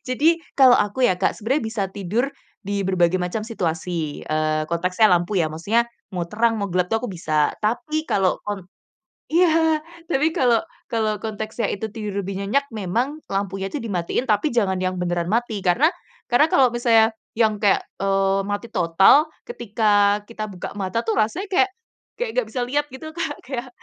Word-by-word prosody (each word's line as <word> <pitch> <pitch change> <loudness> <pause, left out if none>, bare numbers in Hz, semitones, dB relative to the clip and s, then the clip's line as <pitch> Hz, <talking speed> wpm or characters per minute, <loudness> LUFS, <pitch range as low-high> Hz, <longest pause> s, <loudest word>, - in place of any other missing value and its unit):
Jadi 305 +7 +3 0.2
kalau 260 -3 +7
aku 205 +5 0
ya 185 -8 +3
Kak, 190 - +1
sebenarnya 235 +5 -1
bisa 220 -2 -2
tidur 205 +8 -1 0.3
di 200 -1 -2
berbagai 185 -1 +2
macam 180 +4 -2
situasi, 170 -7 -3
eee, 155 0 0
konteksnya 180 +5 +3
lampu 175 +3 +2
ya, 165 -5 +1
maksudnya 200 +9 +1 0.3
mau 180 - -1
terang, 230 +2 +2
mau 200 -3 -3
gelap 180 0 +1
tuh 225 +5 -1
aku 250 - -3
bisa. 155 -4 +1
Tapi 305 +9 -1
kalau 190 -7 +1
kon 205 -2 -3 0.7
iya, 320 -2 +3 0.3
tapi 305 0 +2
kalau 245 -5 +3 0.3
kalau 220 -3 0
konteksnya 220 +1 -3
itu 205 - -4
tidur 210 -3 -3
lebih 195 0 -4
nyenyak 245 +8 +1
memang 235 - -2
lampunya 195 0 -2
itu - - -1
dimatiin, 200 +1 -2
tapi 210 +8 +2
jangan 200 -6 +1
yang 185 0 -1
beneran 175 -1 -1
mati, 225 -1 -1
karena 240 - +4 0.4
karena 245 +5 +5
kalau 265 -4 +5
misalnya 230 -2 +4 0.3
yang 220 -2 +3
kayak, 205 -2 +3 0.2
eee, 195 0 +2
mati 205 +3 -2
total 190 - +5 0.2
ketika 210 - +2
kita 215 -1 -6
buka 185 -3 -7
mata 195 +3 -1
tuh 225 - +1
rasanya 225 - 0
kayak 390 +1 +4 0.5
kayak - - -2
nggak - - 0
bisa 255 - -3
lihat 290 +4 0
gitu 315 +5 -9
Kak, 320 -3 -3
kayak 255 -1 -5
215 Hz, 170 wpm, -22 LUFS, 190-245 Hz, 0.7 s, kalau